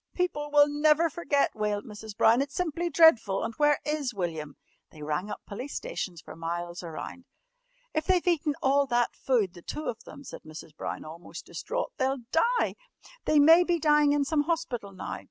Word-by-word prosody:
"People 295 Hz, -5 st, -1 dB
will 290 Hz, 0 st, +6 dB
never 305 Hz, +2 st, +3 dB
forget," 285 Hz, -4 st, 0 dB
wailed 210 Hz, -1 st, -2 dB
Mrs. 210 Hz, 0 st, -10 dB
Brown. 230 Hz, +4 st, +5 dB
"It's 280 Hz, 0 st, -4 dB
simply 345 Hz, 0 st, -1 dB
dreadful. 280 Hz, -, +5 dB
And 225 Hz, -, -3 dB
where 295 Hz, 0 st, +4 dB
is 295 Hz, -6 st, -2 dB
William?" 160 Hz, -6 st, -4 dB, 0.3 s
They 150 Hz, -, -12 dB
rang 155 Hz, +7 st, -2 dB
up -, -, -6 dB
police 250 Hz, +8 st, -7 dB
stations 190 Hz, -, -5 dB
for -, -, -11 dB
miles 170 Hz, +1 st, -4 dB
around. 175 Hz, +10 st, -8 dB, 0.7 s
"If 310 Hz, 0 st, -1 dB
they've 370 Hz, -2 st, +2 dB
eaten 310 Hz, -4 st, +1 dB
all 275 Hz, +1 st, +3 dB
that 240 Hz, -1 st, +1 dB
food 225 Hz, -9 st, 0 dB
the 175 Hz, -, -12 dB
two 300 Hz, -, -6 dB
of 230 Hz, 0 st, -4 dB
them," 280 Hz, +1 st, -12 dB
said -, -, -9 dB
Mrs. 155 Hz, 0 st, -11 dB
Brown -, -, -5 dB
almost 165 Hz, +3 st, -10 dB
distraught, -, -, -4 dB
"they'll 265 Hz, 0 st, 0 dB
die! 475 Hz, +9 st, +2 dB, 0.5 s
They 305 Hz, -, +3 dB
may 325 Hz, +4 st, +7 dB
be 350 Hz, -1 st, +1 dB
dying 300 Hz, -2 st, +4 dB
in 290 Hz, -1 st, +2 dB
some 295 Hz, 0 st, +1 dB
hospital 270 Hz, -11 st, -2 dB
now! 190 Hz, -, -6 dB
275 Hz, 185 wpm, -28 LUFS, 200-310 Hz, 0.7 s, may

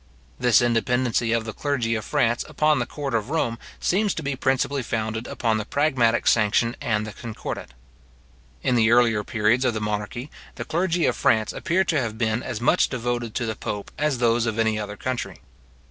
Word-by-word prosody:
This 120 Hz, -1 st, +4 dB
independency 120 Hz, 0 st, +1 dB
of 115 Hz, -1 st, +1 dB
the 110 Hz, -, -5 dB
clergy 125 Hz, -6 st, -1 dB
of 110 Hz, -1 st, -2 dB
France 120 Hz, -5 st, +1 dB
upon 155 Hz, 0 st, +2 dB
the -, -, -2 dB
court 140 Hz, -3 st, -5 dB
of 115 Hz, +1 st, -1 dB
Rome 120 Hz, -7 st, -1 dB, 0.2 s
seems 205 Hz, +3 st, +1 dB
to 160 Hz, -, -4 dB
be 140 Hz, -1 st, -2 dB
principally 130 Hz, +1 st, 0 dB
founded 110 Hz, 0 st, -3 dB
upon 110 Hz, -2 st, 0 dB
the -, -, -2 dB
pragmatic 125 Hz, -2 st, +1 dB
sanction 115 Hz, +2 st, +3 dB
and 105 Hz, -2 st, 0 dB
the 105 Hz, -, -6 dB
concordat. 105 Hz, -, -7 dB, 0.9 s
In -, -, +2 dB
the 115 Hz, -2 st, +4 dB
earlier 115 Hz, -3 st, +4 dB
periods 110 Hz, +4 st, +1 dB
of 125 Hz, -3 st, +1 dB
the -, -, -1 dB
monarchy, 105 Hz, +6 st, -4 dB, 0.2 s
the -, -, -5 dB
clergy 175 Hz, 0 st, 0 dB
of -, -, +1 dB
France 110 Hz, -1 st, +2 dB
appear 185 Hz, +3 st, +1 dB
to 155 Hz, -5 st, +1 dB
have 110 Hz, -3 st, -4 dB
been 110 Hz, 0 st, 0 dB
as 120 Hz, -4 st, -4 dB
much 120 Hz, -, +3 dB
devoted 120 Hz, -2 st, -3 dB
to 120 Hz, -, -1 dB
the 110 Hz, -1 st, -3 dB
pope 100 Hz, 0 st, -5 dB
as 150 Hz, -2 st, 0 dB
those 120 Hz, -1 st, +2 dB
of 110 Hz, 0 st, -2 dB
any 110 Hz, -1 st, +1 dB
other 105 Hz, -1 st, -5 dB
country. 130 Hz, +2 st, -3 dB
120 Hz, 190 wpm, -24 LUFS, 110-130 Hz, 0.9 s, This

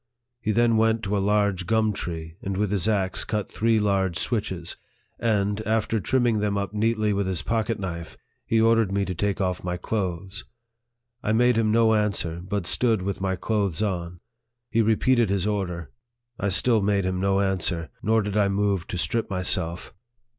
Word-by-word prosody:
He 110 Hz, -, -1 dB
then 115 Hz, 0 st, +3 dB
went 110 Hz, 0 st, +2 dB
to 105 Hz, 0 st, -1 dB
a -, -, +2 dB
large 100 Hz, -3 st, +1 dB
gum 110 Hz, -1 st, +2 dB
tree, 80 Hz, -3 st, -5 dB
and 95 Hz, -1 st, -3 dB
with 105 Hz, -1 st, 0 dB
his 100 Hz, 0 st, +1 dB
axe 100 Hz, -4 st, 0 dB
cut 105 Hz, -2 st, -3 dB
three 115 Hz, 0 st, +2 dB
large 95 Hz, -4 st, +1 dB
switches, -, -, -2 dB, 0.4 s
and, 105 Hz, -2 st, +1 dB
after 110 Hz, 0 st, 0 dB
trimming 120 Hz, 0 st, +1 dB
them 105 Hz, -1 st, 0 dB
up 100 Hz, 0 st, -3 dB
neatly 110 Hz, 0 st, +1 dB
with 100 Hz, -1 st, 0 dB
his 95 Hz, -3 st, -2 dB
pocket 115 Hz, -1 st, -1 dB
knife, 85 Hz, -4 st, -6 dB, 0.3 s
he 115 Hz, -, +1 dB
ordered 115 Hz, -2 st, +3 dB
me 100 Hz, 0 st, 0 dB
to 95 Hz, -, -3 dB
take 100 Hz, +4 st, -1 dB
off 90 Hz, -2 st, -1 dB
my 90 Hz, 0 st, -2 dB
clothes. 95 Hz, 0 st, -3 dB, 0.8 s
I 110 Hz, -, 0 dB
made 120 Hz, +2 st, +4 dB
him 110 Hz, -1 st, +2 dB
no 115 Hz, 0 st, +4 dB
answer, 100 Hz, -6 st, 0 dB
but 95 Hz, 0 st, -3 dB
stood 110 Hz, 0 st, +1 dB
with 100 Hz, 0 st, -3 dB
my 95 Hz, -1 st, 0 dB
clothes 100 Hz, -2 st, -1 dB
on. 90 Hz, -3 st, -3 dB, 0.5 s
He 115 Hz, -, +3 dB
repeated 115 Hz, +1 st, +3 dB
his 100 Hz, -1 st, 0 dB
order. 90 Hz, -8 st, -2 dB, 0.5 s
I 100 Hz, -, 0 dB
still 110 Hz, +3 st, +3 dB
made 100 Hz, -1 st, +1 dB
him 95 Hz, 0 st, -1 dB
no 95 Hz, +1 st, +2 dB
answer, 90 Hz, -4 st, 0 dB
nor 110 Hz, 0 st, +2 dB
did 100 Hz, 0 st, -4 dB
I 105 Hz, -2 st, +3 dB
move 100 Hz, -2 st, 0 dB
to 90 Hz, -, -4 dB
strip 115 Hz, +6 st, -1 dB
myself. 90 Hz, -2 st, -1 dB
100 Hz, 185 wpm, -25 LUFS, 95-110 Hz, 0.8 s, made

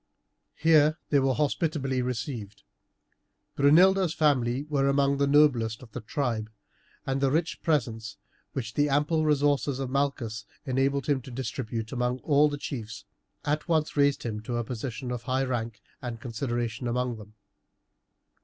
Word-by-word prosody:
Here 155 Hz, -1 st, +4 dB
they 145 Hz, -, +5 dB
were 135 Hz, -1 st, +2 dB
hospitably 145 Hz, -3 st, 0 dB
received. 110 Hz, -4 st, -4 dB, 0.9 s
Brunilda's 175 Hz, +5 st, +5 dB
family 135 Hz, -4 st, +2 dB
were 145 Hz, -2 st, 0 dB
among 140 Hz, 0 st, +2 dB
the 140 Hz, -, +3 dB
noblest 130 Hz, -6 st, +3 dB
of 115 Hz, -, -14 dB
the 125 Hz, -, -6 dB
tribe, 115 Hz, -2 st, -2 dB, 0.6 s
and 135 Hz, 0 st, -1 dB
the 135 Hz, -, +3 dB
rich 160 Hz, +4 st, -1 dB
presents 115 Hz, -9 st, -1 dB, 0.4 s
which 115 Hz, -4 st, -4 dB
the 145 Hz, 0 st, +2 dB
ample 150 Hz, +3 st, +2 dB
resources 145 Hz, -2 st, +2 dB
of 135 Hz, -2 st, -4 dB
Malchus 130 Hz, -6 st, -1 dB, 0.2 s
enabled 135 Hz, +1 st, +1 dB
him 140 Hz, -3 st, +1 dB
to 125 Hz, -, -11 dB
distribute 115 Hz, -2 st, -4 dB
among 125 Hz, 0 st, 0 dB
all 150 Hz, 0 st, +4 dB
the 145 Hz, -, -4 dB
chiefs, 115 Hz, -6 st, -6 dB, 0.4 s
at 150 Hz, +3 st, -1 dB
once 160 Hz, -2 st, +1 dB
raised 140 Hz, -1 st, +3 dB
him 110 Hz, -3 st, -3 dB
to 120 Hz, +2 st, -3 dB
a 120 Hz, -, -1 dB
position 125 Hz, +2 st, -5 dB
of 120 Hz, -2 st, -3 dB
high 130 Hz, +2 st, 0 dB
rank 115 Hz, -4 st, -3 dB, 0.2 s
and 120 Hz, -2 st, -5 dB
consideration 120 Hz, 0 st, -3 dB
among 125 Hz, 0 st, -1 dB
them. 105 Hz, 0 st, -13 dB
130 Hz, 150 wpm, -27 LUFS, 120-145 Hz, 0.9 s, they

